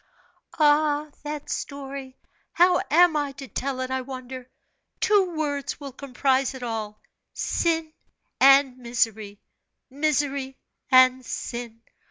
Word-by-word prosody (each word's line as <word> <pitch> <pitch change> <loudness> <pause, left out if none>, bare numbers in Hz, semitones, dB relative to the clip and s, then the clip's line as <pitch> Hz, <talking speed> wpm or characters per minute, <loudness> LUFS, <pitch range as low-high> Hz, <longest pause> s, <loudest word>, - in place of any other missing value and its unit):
"Ah, 300 -1 +3
that 295 -1 -6
story! 275 -2 -6 0.4
How 355 +1 +4
am 345 +1 +5
I 290 -2 -1
to 275 -1 -9
tell 260 +4 -3
it, 255 0 -4
I 260 0 -1
wonder, 255 -1 -8 0.5
two 385 -5 +2
words 285 -3 -2
will 280 -2 -7
comprise 265 0 0
it 255 - -8
all 220 -3 -4 0.4
sin 325 -2 -1 0.5
and 270 -1 +6
misery 220 -4 -2 0.5
misery 280 -2 -1 0.3
and 255 -1 +6
sin! 235 -1 -6
270 Hz, 115 wpm, -25 LUFS, 255-295 Hz, 0.5 s, and